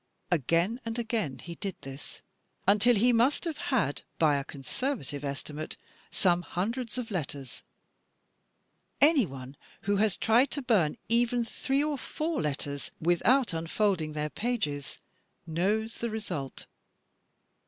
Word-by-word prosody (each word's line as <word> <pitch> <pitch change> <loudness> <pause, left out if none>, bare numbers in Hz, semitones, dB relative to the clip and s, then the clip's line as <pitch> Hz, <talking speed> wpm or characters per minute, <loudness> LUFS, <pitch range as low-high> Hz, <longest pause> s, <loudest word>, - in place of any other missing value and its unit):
"Again 170 - +2
and 230 0 -3
again 220 - -1
he 170 +7 -8
did 195 +1 -4
this," 135 +1 -9 0.4
until 210 +5 +6
he 240 +4 +4
must 240 +5 +3
have 330 -4 -3
had, 200 - +1 0.2
by 150 -3 +4
a 140 - -2
con 135 -1 -10
servative 150 - -2
estimate, 145 +2 -4 0.3
some 175 -2 +3
himdreds 230 +8 -2
of 245 -2 -4
letters. 140 - -4 1.4
Anyone 160 - +3 0.3
who 200 0 +1
has 210 -1 +2
tried 235 +5 +4
to 285 - -3
bum 205 -11 +3
even 235 +1 +3
three 270 +4 0
or 300 -2 -1
four 315 -1 -2
letters 140 -1 -2
without 200 +9 +3
unfolding 165 -1 0
their 150 0 -2
pages 195 - -2 0.5
knows 205 +8 0
the 235 - -1
result. 180 -11 -4
200 Hz, 130 wpm, -29 LUFS, 150-240 Hz, 1.4 s, until